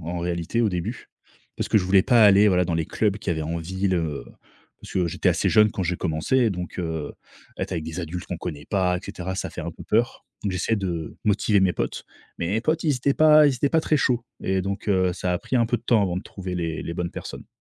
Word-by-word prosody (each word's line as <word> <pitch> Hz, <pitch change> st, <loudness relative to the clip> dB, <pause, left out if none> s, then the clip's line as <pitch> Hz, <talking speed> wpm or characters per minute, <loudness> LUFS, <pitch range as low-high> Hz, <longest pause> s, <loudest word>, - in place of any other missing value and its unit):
en 85 Hz, +2 st, -4 dB
réalité, 85 Hz, +6 st, -1 dB
au 110 Hz, -, +2 dB
début. 90 Hz, +7 st, -4 dB, 0.5 s
Parce -, -, -3 dB
que -, -, +3 dB
je 100 Hz, -, +3 dB
voulais 95 Hz, +1 st, +4 dB
pas 120 Hz, -1 st, +5 dB
aller, 100 Hz, +1 st, +7 dB
voilà, 90 Hz, -2 st, +3 dB
dans 85 Hz, -, -1 dB
les 80 Hz, -1 st, -1 dB
clubs 105 Hz, -2 st, 0 dB
qu'il 95 Hz, -, -3 dB
y -, -, -6 dB
avait -, -, -2 dB
en 80 Hz, +2 st, -3 dB
ville, 95 Hz, +3 st, -1 dB
heu, 75 Hz, -7 st, -2 dB, 0.6 s
parce -, -, -11 dB
que 90 Hz, -2 st, +1 dB
j'étais 85 Hz, -, 0 dB
assez -, -, +2 dB
jeune 105 Hz, 0 st, +5 dB
quand 95 Hz, -, -3 dB
j'ai 90 Hz, 0 st, -1 dB
commencé. 95 Hz, +11 st, +1 dB
Donc, 90 Hz, -3 st, -5 dB
heu, 80 Hz, -3 st, -3 dB, 0.5 s
être -, -, -3 dB
avec 80 Hz, -, -3 dB
des 80 Hz, +2 st, -5 dB
adultes 85 Hz, +1 st, -5 dB
qu'on 90 Hz, -, -5 dB
connaît 75 Hz, -5 st, -6 dB
pas 90 Hz, -3 st, +1 dB
et -, -, -5 dB
cetera, 95 Hz, +1 st, -5 dB
ça 95 Hz, -, -4 dB
fait -, -, -7 dB
un 85 Hz, +1 st, -4 dB
peu -, -, -12 dB
peur. 115 Hz, +3 st, 0 dB, 0.2 s
Donc, 100 Hz, -, -1 dB
j'essayais 95 Hz, +5 st, 0 dB
de 85 Hz, -5 st, -4 dB
motiver 105 Hz, 0 st, +2 dB
mes 95 Hz, -1 st, +3 dB
potes. -, -, -3 dB, 0.3 s
Mais 85 Hz, -, -2 dB
mes 105 Hz, +4 st, 0 dB
potes, 160 Hz, +4 st, 0 dB
ils 150 Hz, -3 st, +3 dB
étaient 135 Hz, +2 st, +1 dB
pas 155 Hz, -1 st, +7 dB
ils 140 Hz, -, +2 dB
étaient 135 Hz, +3 st, +1 dB
pas 165 Hz, -, +3 dB
très 155 Hz, -, +1 dB
chauds 120 Hz, -4 st, +1 dB, 0.2 s
et 95 Hz, 0 st, 0 dB
donc, 100 Hz, +2 st, -4 dB
heu, 95 Hz, -2 st, +2 dB
ça 90 Hz, 0 st, -2 dB
a 90 Hz, -, 0 dB
pris 130 Hz, -, -2 dB
un 120 Hz, -2 st, +3 dB
peu 120 Hz, -, +1 dB
de -, -, -13 dB
temps 115 Hz, -3 st, +3 dB
avant 90 Hz, -3 st, -1 dB
de 90 Hz, -, -3 dB
trouver 95 Hz, -3 st, -7 dB
les 85 Hz, -2 st, -3 dB
les 85 Hz, -, -5 dB
bonnes 85 Hz, 0 st, -3 dB
personnes. -, -, -8 dB
95 Hz, 265 wpm, -24 LUFS, 85-110 Hz, 0.6 s, aller